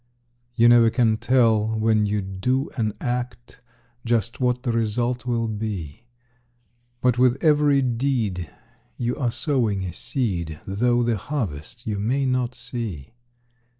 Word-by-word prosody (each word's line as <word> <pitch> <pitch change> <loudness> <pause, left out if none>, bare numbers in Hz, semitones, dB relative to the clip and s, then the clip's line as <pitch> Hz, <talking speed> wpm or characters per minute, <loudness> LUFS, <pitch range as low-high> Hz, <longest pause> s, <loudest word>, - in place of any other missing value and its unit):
You 115 0 +5
never 120 -1 +6
can 115 -2 +2
tell 110 -3 +2
when 110 -1 +2
you 105 -1 -1
do 110 +9 -1
an 110 -4 -1
act 125 0 -4 0.4
Just 115 -1 0
what 125 -1 0
the 125 - 0
result 120 +2 -1
will 115 -2 0
be; 105 -3 -5 1.0
But 125 -1 +2
with 125 0 +4
every 145 -3 +4
deed 115 - -1 0.5
you 120 0 -1
are 125 -5 0
sowing 120 -5 0
a 90 -3 -5
seed, 85 - -3
Though 120 +5 +1
the 115 -2 +1
harvest 110 - -5
you 105 -2 -2
may 130 +7 0
not 125 -1 0
see. 115 - -6
120 Hz, 135 wpm, -23 LUFS, 105-125 Hz, 1.0 s, never